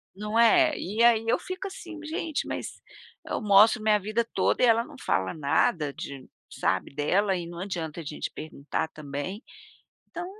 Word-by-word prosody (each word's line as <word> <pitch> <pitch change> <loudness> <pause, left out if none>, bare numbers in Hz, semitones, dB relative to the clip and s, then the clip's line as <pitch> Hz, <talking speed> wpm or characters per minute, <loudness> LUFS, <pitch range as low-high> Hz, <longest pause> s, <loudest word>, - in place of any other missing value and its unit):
Não 210 +2 -3
é. 310 +6 +5
E 215 +5 -1
aí 230 -2 +5
eu 230 - +3
fico, 370 +1 -5
assim: 345 -4 -9
"Gente, 315 0 -3
mas - - -5 0.4
eu - - -3
mostro 210 +1 +6
minha 215 -1 +3
vida 215 +4 -1
toda - - +1
e - - +8
ela 230 -1 +4
não 295 +4 -13
fala 95 - 0
nada 150 0 +1
de, 135 -2 -8 0.2
sabe, - - -1
dela". 190 +8 +1
E 175 -2 -4
não 170 0 -8
adianta 170 -4 -4
a - - -9
gente 150 0 -5
perguntar 155 +1 -4
também, 155 - -6 0.7
então, 345 0 -6
205 Hz, 175 wpm, -27 LUFS, 160-235 Hz, 0.7 s, e